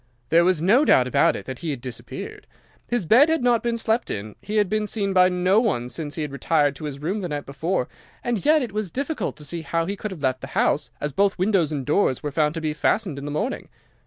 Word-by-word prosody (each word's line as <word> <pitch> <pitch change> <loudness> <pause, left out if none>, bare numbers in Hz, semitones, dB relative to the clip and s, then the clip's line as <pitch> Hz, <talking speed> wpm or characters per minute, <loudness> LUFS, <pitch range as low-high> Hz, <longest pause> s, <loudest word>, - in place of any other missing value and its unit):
There 170 +1 +5
was 175 -3 +2
no 230 +10 +5
doubt 130 - +4
about 130 - +3
it - - -7
that 130 -2 -6
he 165 - -4
had 140 -4 -3
disappeared. 120 -1 -8 0.4
His 240 -6 -1
bed 250 - +6
had 320 -5 +1
not 240 -2 +3
been 235 0 -1
slept 225 +1 0
in, 105 +1 -5
he 210 - -5
had 205 -2 +3
been 215 +1 -1
seen 200 -2 -1
by 185 -1 +6
no 180 +3 +3
one 155 - 0
since 145 +1 -5
he 160 - -2
had 150 - -5
retired 145 0 +1
to 155 - -7
his 145 -2 -5
room 180 +9 -3
the 180 - -4
night 145 -1 -4
before, 145 +1 -2 0.4
and 240 -4 -1
yet 305 -1 +4
it 235 - -5
was 210 -2 -3
difficult 275 - -3
to 150 - -10
see 165 +3 -4
how 165 +2 -1
he 200 +3 -3
could 215 - -5
have 175 -7 -9
left 130 -1 0
the - - -6
house, - - +2
as 145 - -2
both 195 +7 +1
windows 185 -5 +2
and 140 -4 -3
doors 150 -4 +1
were 145 - -2
found 150 +1 +1
to 165 - -3
be 155 -1 -1
fastened 160 0 0
in 140 - -7
the - - -4
morning. 210 - -3
175 Hz, 260 wpm, -23 LUFS, 145-215 Hz, 0.4 s, bed